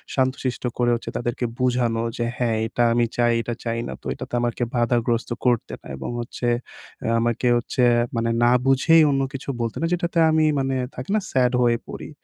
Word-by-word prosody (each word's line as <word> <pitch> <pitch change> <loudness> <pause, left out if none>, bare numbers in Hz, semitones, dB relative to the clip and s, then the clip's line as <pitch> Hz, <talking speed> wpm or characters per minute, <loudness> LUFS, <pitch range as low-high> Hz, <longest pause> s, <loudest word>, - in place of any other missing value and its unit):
শান্তশিষ্ট 130 -1 -1
করে 120 -1 +2
হচ্ছে 115 - -6
তাদেরকে 120 +1 -2
বুঝানো 120 -2 +1
যে 120 - -1
হ্যাঁ 115 -3 0
এটা 120 - 0
আমি 120 0 +3
চাই, 120 -1 +3
এটা 120 +1 -4
চাই 115 0 -1
না। - - -5
তো - - -27
এটাতে - - -9
আমাকে 120 0 -1
বাধাগ্রস্ত 120 0 +1 0.2
করতে 120 -3 +1
না - - -13
এবং 65 - -5
হচ্ছে 120 0 -4 0.5
অ্যা 115 - -1
আমাকে 120 +1 0
হচ্ছে 120 +1 -1 0.3
মানে 115 0 0
না 120 - +5
বুঝেই 145 +5 +5
অন্য 135 0 +1
কিছু 135 +1 -6
বলতে 115 -1 -2
না - - +1
যেটাতে 175 -1 -1
আমি 155 0 +3
মানে 135 0 0 0.2
থাকে 130 +8 -7
না, - - +3
স্যাড 125 -2 +3
হয়ে 120 -1 +2
পড়ি। - - -7
120 Hz, 190 wpm, -23 LUFS, 115-130 Hz, 0.5 s, না